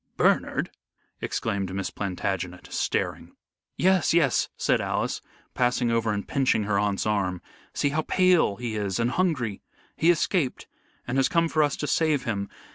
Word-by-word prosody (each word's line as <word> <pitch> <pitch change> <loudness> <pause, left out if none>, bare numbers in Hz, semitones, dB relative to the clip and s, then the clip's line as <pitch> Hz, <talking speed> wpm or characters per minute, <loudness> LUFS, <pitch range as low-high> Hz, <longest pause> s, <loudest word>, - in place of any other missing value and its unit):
"Bernard!" - - +2 0.5
exclaimed 100 -4 -2
Miss 95 -2 -3
Plantagenet, 90 -2 -4
staring. - - -2 0.4
"Yes, 185 -2 +3
yes!" 150 -7 +3
said - - +2
Alice, - - -1 0.3
passing 125 -1 +1
over 115 -1 +1
and 100 -1 -3
pinching 130 -5 +2
her 100 -1 +1
aunt's 100 -1 0
arm. 100 -4 0 0.4
"See 145 - +1
how 155 +2 0
pale 180 - +3
he 115 0 -4
is 100 -2 -2
and 120 +1 +1
hungry. 130 - 0 0.3
He 165 - +3
escaped, 170 -4 +1 0.4
and 125 +2 0
has 135 - +3
come 170 -1 +2
for 155 -1 +1
us 145 -2 +1
to - - -3
save 150 -1 +1
him. 100 -4 -2
120 Hz, 155 wpm, -26 LUFS, 100-155 Hz, 0.5 s, Yes